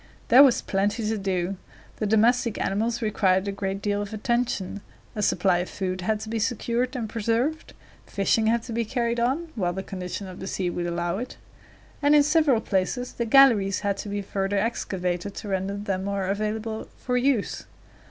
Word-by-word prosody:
There 250 +3 +9
was 270 -4 +5
plenty 205 +3 0
to 220 0 0
do. 190 -1 -1 0.4
The 215 - -1
domestic 225 +2 +3
animals 225 +4 -1
required 195 -3 +2
a - - 0
great 195 0 -4
deal 205 0 0
of 205 +1 -5
attention; 230 -4 -1 0.3
a 210 - -2
supply 180 -2 +2
of 180 - -3
food 185 -1 -3
had 215 +3 0
to 220 - -6
be 225 0 -1
secured 240 +3 -1
and 235 -3 -2
preserved; 230 +8 -1 0.3
fishing 220 +3 +1
had 230 +1 +2
to 235 - -6
be 235 +1 0
carried 235 +1 -1
on 270 +8 0
while 180 -5 -1
the 190 +1 -4
condition 185 +1 -5
of 185 -1 -9
the 190 - -6
sea 185 -2 -2
would 175 0 -3
allow 175 +2 -2
it; 250 +2 -6 0.6
and 290 +1 +5
in 295 - +7
several 300 -6 +3
places 205 +6 -1
the 235 - -2
galleries 220 -6 +5
had 200 -1 0
to 205 - -6
be 205 0 -3
further 195 +1 -1
excavated 190 -3 -2
to - - -7
render 195 0 -1
them 195 -2 -2
more 200 -1 -1
available 215 +3 -2
for 250 - -2
use. 250 -3 0
210 Hz, 190 wpm, -25 LUFS, 195-235 Hz, 0.6 s, There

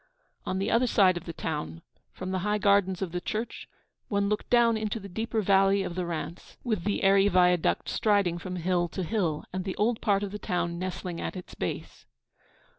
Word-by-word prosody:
On 185 - -1
the 195 +3 -1
other 245 +2 +3
side 190 -5 +4
of 175 0 -6
the 170 - -4
town, 80 - -4 0.3
from 185 0 -6
the 190 - 0
high 210 +3 0
gardens 200 -2 +3
of 180 - -4
the 180 +1 -3
church, 220 +5 -4 0.4
one 200 -1 0
looked 210 - -2
down 235 -1 +5
into 220 0 -2
the 200 - -9
deeper 220 +3 -2
valley 195 0 +4
of 180 - -4
the 180 0 -3
Rance, 170 0 -6
with 215 -8 -1
the 205 0 0
airy 195 +1 +5
viaduct 180 -3 +3
striding 200 -5 +1
from 185 0 -5
hill 175 0 +1
to 185 +2 -4
hill, 170 -5 -1
and 185 0 -2
the 190 0 -4
old 220 +2 +1
part 200 -1 +2
of 200 - -4
the 210 - -6
town 175 -2 -2
nestling 180 -1 -4
at - - -4
its 180 - -8
base. - - -5
190 Hz, 205 wpm, -28 LUFS, 180-210 Hz, 0.4 s, down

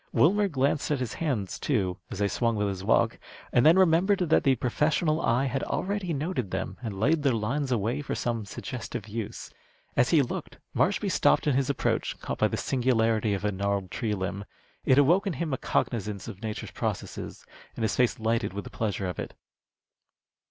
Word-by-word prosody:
Wilmer 200 +6 +4
glanced 140 -3 0
at 150 - +2
his 125 -3 -3
hands, 125 - -2
too, 95 -9 0
as - - -6
they 100 +1 +2
swung 115 +2 0
with 105 -1 0
his 95 -1 -5
walk, 110 - +2 0.3
and 120 - +5
then 165 +4 +7
remembered 190 +2 +4
that 175 -4 +2
the 135 -2 +4
professional 155 +6 +1
eye 120 +4 +2
had 135 0 -1
already 195 -2 -2
noted 145 - -2
them 90 - -3
and 105 -6 -5
laid 150 +8 +3
their 135 -4 +2
lines 130 +6 -1
away 120 +4 0
for 145 - -3
some 115 -2 -2
suggestive 110 +1 -6
use. 110 0 -6 0.4
As 120 - +3
he 155 -4 +5
looked, 125 - -5 0.2
Marshby - - +1
stopped 70 - +3
in 150 - +3
his 135 0 +1
approach, 140 - -1
caught - - -5
by - - +4
the - - -3
singularity 115 -4 +1
of 100 - -4
a 105 - +2
gnarled 100 -1 -2
tree 110 -4 -1
limb. 100 +1 -4 0.4
It 130 - +5
awoke 170 +9 +4
in 190 - 0
him 155 +1 -2
a - - 0
cognizance 105 -4 -1
of 95 - -8
nature's 110 -2 -5
processes, - - -4 0.3
and 115 - -3
his 110 - +1
face 125 0 +2
lighted 110 -3 0
with 100 0 -4
the - - -10
pleasure 105 -3 -2
of 90 - -5
it. - - -5
120 Hz, 195 wpm, -27 LUFS, 105-145 Hz, 0.4 s, then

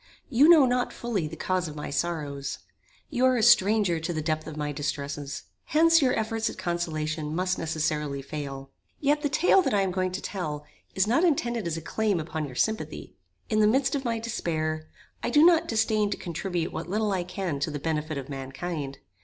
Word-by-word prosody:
You 280 +6 +6
know 320 -5 +8
not 250 0 +1
fully 215 -9 -2
the 160 - -7
cause 185 +1 -1
of 150 - -8
my 150 - -5
sorrows. 145 -4 -2 0.5
You 255 -2 0
are 255 -1 +4
a 225 - +1
stranger 210 -6 +5
to 160 +2 -3
the 160 - -2
depth 155 0 -2
of 155 -1 -7
my 150 -1 -2
distresses. 145 0 -4 0.2
Hence 330 +2 +5
your 255 -2 +2
efforts 225 0 -1
at - - -8
consolation 155 -3 -2
must 185 +1 0
necessarily 150 -3 -1
fail. 135 -2 -6 0.3
Yet 295 +1 +2
the 290 - 0
tale 360 +7 +4
that 280 - 0
I 200 - +3
am 190 -1 0
going 185 0 -1
to 190 - -2
tell 150 -6 -4 0.3
is 190 - +3
not 245 +10 +2
intended 240 - +1
as 165 -1 -2
a - - -5
claim 205 +2 0
upon 155 -1 -3
your 130 - -10
sympathy. 155 -3 -2 0.3
In 215 - +1
the 210 - +5
midst 260 +6 +2
of 280 -2 -1
my 230 -2 -1
despair, 155 -8 -2 0.3
I - - -1
do 300 +2 +6
not 340 -2 +5
disdain 220 -2 +1
to 200 - -2
contribute 175 0 -3
what - - -5
little 210 +2 0
I 185 -2 0
can 180 -4 -3
to 145 - -1
the 150 - -4
benefit 155 0 -2
of 135 -1 -5
mankind. 135 +1 -5
175 Hz, 205 wpm, -27 LUFS, 155-225 Hz, 0.5 s, know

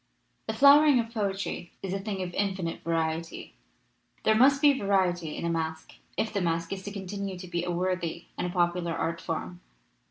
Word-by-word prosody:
"The - - -2
flowering 285 -1 +7
of 230 0 -3
poetry 195 -5 -3
is 190 -1 -3
a 195 - -1
thing 195 -2 -3
of 175 -1 -6
infinite 190 -4 -2
variety. 165 0 -2 0.7
There 220 - +4
must 270 +5 +5
be 290 -1 +6
variety 185 -7 0
in - - -3
a - - 0
masque 160 -1 -3 0.2
if 220 - -1
the 200 - 0
masque 165 0 -1
is 195 - -5
to 205 - -5
continue 195 -1 -5
to 180 0 -8
be 175 -1 -2
a 180 - -3
worthy 175 -1 -2
and 180 - -2
popular 175 -1 0
art 165 +1 -2
form. 175 +2 -4
180 Hz, 185 wpm, -28 LUFS, 170-200 Hz, 0.7 s, flowering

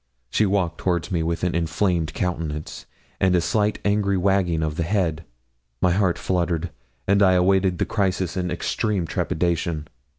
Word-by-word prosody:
She 110 - +3
walked 95 -4 0
towards 90 +1 -1
me 85 -3 +1
with 85 +1 -2
an 90 - +1
inflamed 85 -1 0
countenance, 80 -4 -3 0.3
and 95 -1 +3
a - - +4
slight 105 +4 +1
angry 100 -1 +2
wagging 90 -4 +1
of 75 -1 -2
the 85 - -2
head; 85 -3 0 0.5
my 90 - +3
heart 95 -1 +2
fluttered, 85 -2 -1 0.4
and 100 +1 +3
I 95 -2 +6
awaited 95 0 +3
the - - 0
crisis 95 -4 -1
in 90 -1 -1
extreme 95 +2 -1
trepidation. 85 -1 -1
90 Hz, 160 wpm, -23 LUFS, 85-95 Hz, 0.5 s, I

